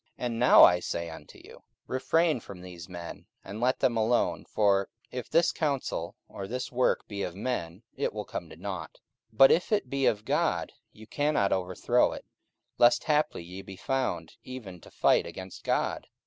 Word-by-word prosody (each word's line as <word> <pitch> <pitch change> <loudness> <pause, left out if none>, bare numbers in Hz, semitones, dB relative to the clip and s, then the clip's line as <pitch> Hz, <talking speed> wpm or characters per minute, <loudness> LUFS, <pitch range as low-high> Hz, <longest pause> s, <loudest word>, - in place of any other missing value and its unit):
44:005:038 - - -4
And 115 -1 -2
now 125 - +8
I 90 - +7
say 85 -1 -4
unto 80 -2 -12
you, - - -14 0.2
Refrain 160 +3 +1
from 100 -4 -11
these 90 -1 -10
men, 85 0 -8 0.2
and 105 +4 -7
let 125 +2 +1
them 120 -2 +2
alone: 115 +2 +1
for 100 -2 +2 0.2
if 125 -2 -6
this 165 +1 +3
counsel 145 -5 -2
or 95 - -7
this 125 +3 -4
work 125 0 +1
be 100 -2 -5
of 90 -2 -4
men, 100 -4 -4
it - - -1
will - - -5
come - - -6
to - - -11
nought: - - -6 0.3
44:005:039 110 - -27
But 135 - +8
if 180 - +2
it 205 -11 +1
be 140 -1 +1
of 105 0 0
God, - - 0 0.2
ye 110 - -14
cannot 145 -4 +1
overthrow 90 -1 +1
it; - - -9 0.5
lest 120 0 +5
haply 150 - +1
ye 90 +3 -8
be 95 - -10
found 135 +6 -2
even 105 -9 -9
to - - -14
fight - - +2
against 95 -1 -9
God. - - -1
110 Hz, 190 wpm, -28 LUFS, 95-130 Hz, 0.5 s, now